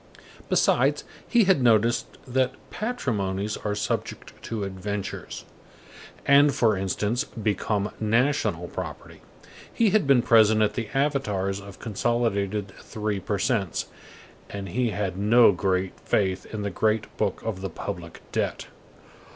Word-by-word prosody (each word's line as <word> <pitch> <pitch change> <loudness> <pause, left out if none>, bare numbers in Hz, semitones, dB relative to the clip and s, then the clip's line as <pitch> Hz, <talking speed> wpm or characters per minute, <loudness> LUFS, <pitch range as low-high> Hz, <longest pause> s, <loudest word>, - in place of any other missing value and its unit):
Besides, - - +3 0.2
he 240 -2 +4
had 190 -7 +3
noticed 115 -1 +3 0.2
that 130 0 +1 0.2
patrimonies 105 - -2
are 105 -1 -3
subject 105 - -3
to 110 -3 -4
adventures, 100 +1 -5 0.8
and, 140 0 +6
for 110 -3 +3
instance, 105 +6 -1
become 105 -3 -2
national 125 +7 +1
property; - - -7 0.5
he 225 -4 +2
had 210 -7 +2
been 130 -4 +5
present 110 -1 +5
at 105 - +1
the 115 -4 -4
avatars 105 -9 0
of 100 -1 -11
consolidated 105 -3 -1
three 105 -2 -3
per 100 +2 -2
cents, 100 -4 -1 0.6
and 100 -1 -6
he 120 +5 0
had 100 -3 -3
no 115 +3 +6
great 95 0 -1
faith 95 -2 0
in 105 -2 -4
the 100 - -2
Great 110 +3 0
Book - - 0
of 105 -4 -3
the 95 - -3
Public 85 0 -7
Debt. - - -2
105 Hz, 130 wpm, -25 LUFS, 100-120 Hz, 0.8 s, and